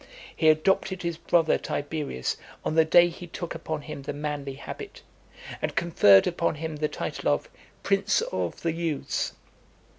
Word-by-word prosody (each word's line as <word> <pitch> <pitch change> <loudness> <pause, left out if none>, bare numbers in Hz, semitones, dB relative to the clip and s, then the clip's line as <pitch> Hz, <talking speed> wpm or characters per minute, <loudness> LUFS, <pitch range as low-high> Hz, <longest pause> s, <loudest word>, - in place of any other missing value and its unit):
He 160 - +4
adopted 185 +3 +2
his 170 -1 -2
brother, 170 -1 +3
Tiberius, 145 - -3 0.3
on - - 0
the 160 0 +6
day 175 +2 +6
he 175 +1 -8
took 175 0 -5
upon 155 -2 -4
him 150 -2 -7
the 135 - -5
manly 145 -2 -4
habit, 140 - -9 0.6
and - - -2
conferred 105 - +6
upon 170 -2 0
him 160 0 -5
the 150 +1 0
title - - -3
of - - -1 0.3
"Prince 200 - +2
of - - -3
the 165 - +1
Youths." 165 -3 -2
160 Hz, 155 wpm, -27 LUFS, 150-170 Hz, 0.6 s, the